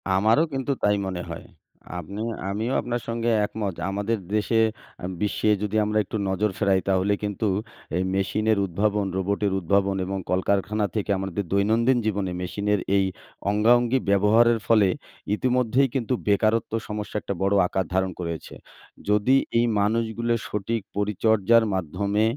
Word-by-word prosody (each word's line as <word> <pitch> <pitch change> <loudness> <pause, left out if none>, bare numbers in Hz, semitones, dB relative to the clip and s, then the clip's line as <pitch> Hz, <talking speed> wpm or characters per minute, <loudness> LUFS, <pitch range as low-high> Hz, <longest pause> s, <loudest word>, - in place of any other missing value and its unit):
আমারও 110 +10 +4
কিন্তু 135 +1 -1
তাই 105 - +4
মনে 95 -2 -3
হয়। 85 - -7 0.5
আমি 100 +5 -6 0.3
আমিও 110 +6 -2
আপনার 120 0 -3
সঙ্গে 115 0 -1 0.2
একমত। 105 -2 -4 0.2
আমাদের 105 +3 -1 0.2
দেশে 110 +2 +1 0.5
আ - - -2 0.2
বিশ্বে 105 +1 0
যদি 105 0 -2
আমরা 105 +1 0
একটু 105 - -4
নজর 100 +3 +1
ফেরাই 100 -2 +3
তাহলে 95 +2 +2
কিন্তু 105 +1 -2 0.5
এই 90 - +1
মেশিনের 110 +3 +1
উদ্ভাবন, 100 +3 0
রোবটের 100 +1 0
উদ্ভাবন 100 +2 +1
এবং 95 +1 -3
কলকারখানা 100 +3 +1
থেকে 105 -1 -1
আমাদের 95 +1 -3
দৈনন্দিন 110 +6 +3
জীবনে 100 -3 -1
মেশিনের 100 +3 -1 0.2
এই 95 - +3 0.4
অঙ্গাঅঙ্গি 120 +4 +3
ব্যবহারের 110 +4 +4
ফলে 110 -4 +5 0.5
ইতিমধ্যেই 125 +2 +2
কিন্তু 130 -1 0
বেকারত্ব 110 +2 +2
সমস্যা 105 -1 -5
একটা 100 - -3
বড় 100 +1 +2
আকার 95 +1 -1
ধারণ 95 0 +1
করেছে। 85 -2 -5 0.6
যদি 105 +5 +4 0.2
এই 120 - +3
মানুষগুলো 115 +2 0
সঠিক 105 +2 -2 0.2
পরিচর্যার 110 +2 +3
মাধ্যমে 100 +4 -1
105 Hz, 140 wpm, -24 LUFS, 95-115 Hz, 0.6 s, ফলে